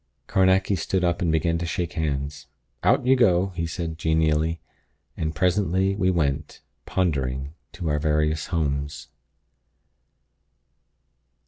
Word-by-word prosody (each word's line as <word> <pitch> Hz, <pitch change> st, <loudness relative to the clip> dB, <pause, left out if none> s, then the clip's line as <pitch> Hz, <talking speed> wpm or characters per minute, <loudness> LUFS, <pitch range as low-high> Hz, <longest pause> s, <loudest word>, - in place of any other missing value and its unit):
Carnacki 95 Hz, +1 st, +3 dB
stood 95 Hz, +1 st, -1 dB
up 85 Hz, -1 st, +1 dB
and 85 Hz, -3 st, +2 dB
began 80 Hz, +1 st, +1 dB
to 85 Hz, -, -2 dB
shake 85 Hz, +1 st, -2 dB
hands. 75 Hz, -3 st, -3 dB, 0.3 s
"Out -, -, +3 dB
you 130 Hz, +1 st, +5 dB
go!" 95 Hz, -6 st, +3 dB
he 85 Hz, -2 st, -3 dB
said, 80 Hz, -1 st, -5 dB
genially. 80 Hz, 0 st, +1 dB, 0.6 s
And 80 Hz, 0 st, -3 dB
presently 95 Hz, +1 st, +1 dB
we 95 Hz, -2 st, +1 dB
went, 75 Hz, -4 st, -1 dB, 0.3 s
pondering, 70 Hz, -6 st, -1 dB, 0.2 s
to 90 Hz, -5 st, -5 dB
our 75 Hz, -1 st, +1 dB
various 75 Hz, 0 st, 0 dB
homes. 75 Hz, -3 st, -2 dB
80 Hz, 120 wpm, -24 LUFS, 75-90 Hz, 0.6 s, you